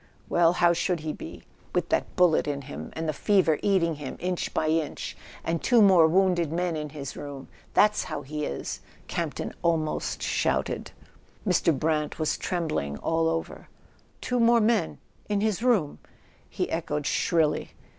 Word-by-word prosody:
Well, 170 0 +4
how 175 -1 +4
should 175 -1 -1
he 155 -1 -3
be, 85 0 -9 0.3
with - - 0
that - - 0
bullet 175 -4 +4
in 140 -1 -2
him, 140 - -7
and 160 0 -4
the 155 - 0
fever 175 -3 +2
eating 170 -6 +2
him 145 -3 -6
inch 180 -1 -2
by 155 - 0
inch, 160 -1 -2 0.3
and 165 0 -1
two 240 -1 +4
more 190 -6 +7
wounded 175 -2 +2
men 175 0 -1
in 150 -1 -4
his 140 -2 -7
room? 140 -2 -8 0.3
That's 210 0 +4
how 155 -4 -5
he 150 +2 -4
is! 70 - -4
" - - -27
Camp¬ - - -2
ton - - -4
almost 160 -2 -1
shouted. - - 0 0.6
Mr. 180 -2 +3
Brant 150 +1 0
was 155 -1 0
trembling 155 - -2
all 165 0 +1
over. 165 0 -4 0.5
"Two 250 -1 -1
more 235 0 +5
men 225 0 +1 0.2
— - - -33
in 205 -1 +1
his 215 -1 0
room?" 220 -12 +2 0.5
he - - -2
echoed 150 -3 -2
shrilly. 160 -1 +1
165 Hz, 170 wpm, -27 LUFS, 150-185 Hz, 0.6 s, more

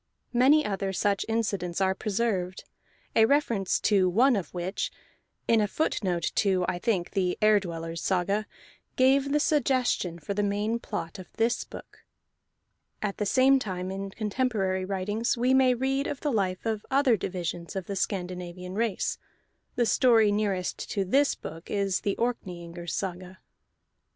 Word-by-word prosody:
Many 275 +5 +5
other 195 -1 -2
such 200 +1 0
incidents 200 -6 -1
are 190 -1 +2
preserved, 195 -3 -2 0.5
a 220 - +6
reference 230 -8 +1
to 195 -3 +3
one 245 +8 +4
of 195 -4 -3
which 180 +2 -3 0.6
(in 225 -1 +4
a 210 - +2
footnote 185 - -1
to 190 -3 +2
I 175 - -1
think 185 -5 0
the 185 -3 0
Ere 215 -1 +5
Dwellers' 165 -3 -5
Saga) 195 +3 0 0.5
gave 270 +2 +3
the 295 - +3
suggestion 255 - +1
for 170 +5 -4
the 205 - 0
main 205 +3 0
plot 205 -5 -5
of 185 - -11
this 230 +1 +1
book. - - -12 1.0
At 200 -2 -2
the 210 - -1
same 265 +5 +5
time, 185 -5 -4
in 195 +1 -4
contemporary 205 -3 -1
writings, 205 +5 -1
we 250 +2 +2
may 260 -1 +5
read 270 +3 0
of 280 - -5
the 295 - 0
life 190 -4 -1
of 220 -2 -1
other 270 -3 +4
divisions 175 -2 -4
of 190 -2 -3
the 200 - -4
Scandinavian 180 -1 -4
race; 225 0 -1 0.6
the 240 - +2
story 225 -2 +4
nearest 200 -3 -1
to 195 -2 -1
this 280 +9 +3
book 165 +2 -9
is 200 -2 0
the 200 - -1
Orkneyingers' 175 -7 -4
Saga. 185 0 -5
200 Hz, 155 wpm, -27 LUFS, 185-235 Hz, 1.0 s, a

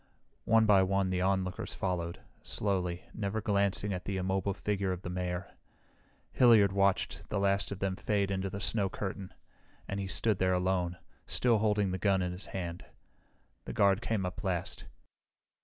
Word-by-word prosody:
One 115 0 +5
by 100 -3 +6
one, 95 0 +1
the 90 0 0
onlookers 95 -1 -1
followed, 85 -2 -2 0.2
slowly, 90 -4 -1
never 105 0 -2
glancing 100 -2 +1
at 90 -1 -5
the 95 -1 -2
immobile 95 +1 -1
figure 100 -2 -1
of 90 0 -4
the 90 - -4
Mayor. 90 0 -3 0.8
Hilliard 115 -6 +6
watched 100 0 0
the 105 - -1
last 100 0 +1
of 100 - -3
them 95 -1 -1
fade 100 0 0
into 95 0 -1
the 100 - -5
snow 100 -1 +1
curtain, 95 -1 -5 0.6
and 100 - -3
he 100 - -3
stood 105 +2 +1
there 95 0 +3
alone, 90 -1 0 0.3
still 120 -3 +2
holding 105 -2 +2
the 95 - -3
gun 95 -2 +2
in 90 - -2
his 90 +3 -7
hand. 85 -2 -5 0.8
The - - -5
guard 100 +1 +3
came 110 -5 -1
up 90 0 -4
at - - -8
last. 90 -2 -2
95 Hz, 175 wpm, -31 LUFS, 90-100 Hz, 0.8 s, by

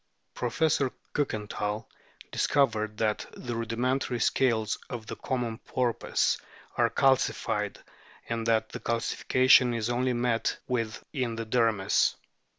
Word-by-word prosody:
Professor 135 +2 +1 0.2
Ktikenthal 105 -5 -2 0.5
dis - - +1
covered 110 -6 +1
that 105 -1 0
the 120 -1 -4
rudimentary 120 +2 -1
scales 115 -5 +1
of 115 -3 -5
the - - -6
common 120 -4 -3
porpoise 125 -3 0 0.4
are - - +3
calcified, 135 -1 +1 0.5
and 115 -1 -2
that 110 -1 +2
the - - -6
calcification 125 +1 +3
is 115 +1 -1
only 125 +1 +1
met 120 -1 0
with 115 -4 -2
in 125 -5 -1
the 115 0 -4
dermis. 110 -4 +2
115 Hz, 120 wpm, -28 LUFS, 110-125 Hz, 0.5 s, are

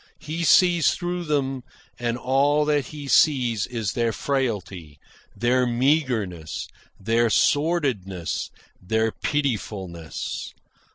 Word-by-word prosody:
He 160 +3 -4
sees 175 -1 +5
through 175 0 -3
them, 135 -3 -1 0.4
and 120 0 -1
all 140 +4 +2
that 145 -3 +1
he 145 -2 -8
sees 125 -7 +3
is 115 -5 -3
their 115 -1 +1
frailty, 100 - -3 0.4
their 125 +1 +2
meagreness, 120 - 0 0.3
their 115 +3 +2
sordidness, 125 - 0 0.3
their 110 +4 0
pitifulness. 100 - -3
125 Hz, 100 wpm, -24 LUFS, 105-145 Hz, 0.4 s, sees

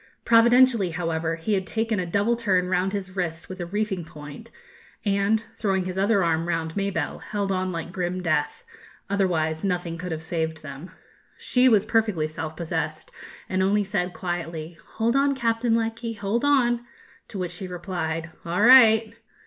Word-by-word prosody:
Providentially, 235 -3 +5
however, 165 -1 -2
he 165 +6 -2
had 190 -1 0
taken 225 -2 -1
a 180 - -2
double 205 +7 +1
turn 190 -6 +1
round 185 +1 +1
his 190 -2 -5
wrist 170 -3 -3
with 185 -1 -7
a 175 - -4
reefing 200 -1 -2
point, 150 -2 -11 0.6
and, 200 +2 +2 0.2
throwing 190 -3 0
his 185 0 -4
other 200 0 +2
arm 165 0 0
round 160 -1 -2
Mabelle, 195 -6 -2
held 200 -2 -3
on 185 0 -1
like 170 0 -5
grim 180 0 -2
death; 170 - -1 0.5
otherwise 160 -5 0
nothing 175 -3 -2
could 180 0 -5
have 160 0 -4
saved 160 -1 -2
them. 145 +4 -8 0.5
She 255 +1 +3
was 210 -4 +4
perfectly 215 -9 +1
self 155 0 -6
possessed, 170 - -3 0.4
and 185 0 0
only 205 +2 +2
said 190 -2 -2
quietly, 170 -2 -5 0.2
'Hold 230 +2 +1
on, 275 0 +3
Captain 230 -2 +1
Lecky, 230 0 -2
hold 210 +3 -2
on!' 245 -5 +3 0.4
to 205 - -8
which 180 -1 -3
he 190 - -6
replied, 170 -3 -4
'All 175 +4 0
right.' 225 -3 +7
185 Hz, 165 wpm, -25 LUFS, 170-220 Hz, 0.6 s, right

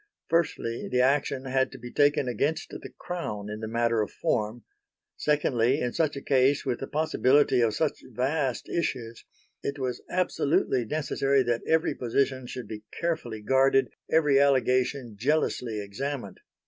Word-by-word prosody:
Firstly 165 -8 0
the 125 - +2
action 135 0 +1
had 130 0 +1
to - - -8
be 120 0 -9
taken 145 -2 +3
against 145 +7 -1
the - - -8
Crown 105 -13 -5
in 105 - -5
the 110 - -4
matter 115 0 +1
of 105 - -2
form; 115 -7 -2 0.5
secondly 135 -3 +1
in 125 -3 -2
such 155 -3 0
a 140 - -6
case 135 +1 +3
with 125 -3 -1
the 135 - -5
possibility 145 -4 +3
of 110 -2 +2
such 155 +3 -1
vast 130 +2 -1
issues 120 -9 -3 0.4
it 140 - -3
was 130 -3 -3
absolutely 140 -8 +1
necessary 140 -1 +1
that 120 -1 0
every 160 0 +2
position 130 +1 -1
should 125 -3 -7
be 105 0 -7 0.2
carefully 155 -11 -2
guarded, 135 +2 +3 0.2
every 150 -4 +4
allegation 130 -3 +2
jealously 125 -4 0
examined. 105 +2 -5
130 Hz, 150 wpm, -27 LUFS, 120-145 Hz, 0.5 s, every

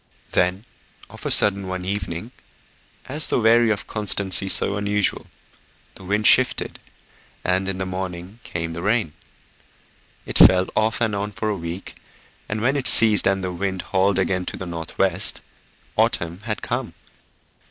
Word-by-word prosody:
Then, 90 +5 0 0.5
of - - -8
a - - -2
sudden 100 -2 +4
one 95 0 -5
evening, 95 +2 -4 0.7
as 150 +4 -2
though - - 0
weary 115 +1 +4
of 105 -2 -1
a - - -16
constancy 95 -3 +1
so 100 - 0
unusual, 105 0 -1 0.7
the 95 - -13
wind 105 +3 -1
shifted - - +2 0.6
and 95 +1 0
in 95 - -4
the 95 - -3
morning 95 +2 -6
came 80 0 -5
the 85 - -6
rain. 105 -5 0 1.1
It - - -2
fell 95 0 +7
off 110 +1 0
and 110 -3 0
on 105 +1 -4
for 110 +2 -3
a 105 - -1
week, 85 +1 -7 0.5
and 105 +1 -3
when 135 +5 +1
it 130 - +5
ceased 110 -2 +6
and 95 -1 0
the 90 -1 -3
wind 95 +1 -3
hauled 95 0 +2
again 90 -1 0
to - - -5
the 95 - -6
north 85 -1 -7
west, 95 0 +3 0.5
autumn 85 +1 0
had 105 -2 -4
come. - - -4
95 Hz, 165 wpm, -22 LUFS, 90-105 Hz, 1.1 s, fell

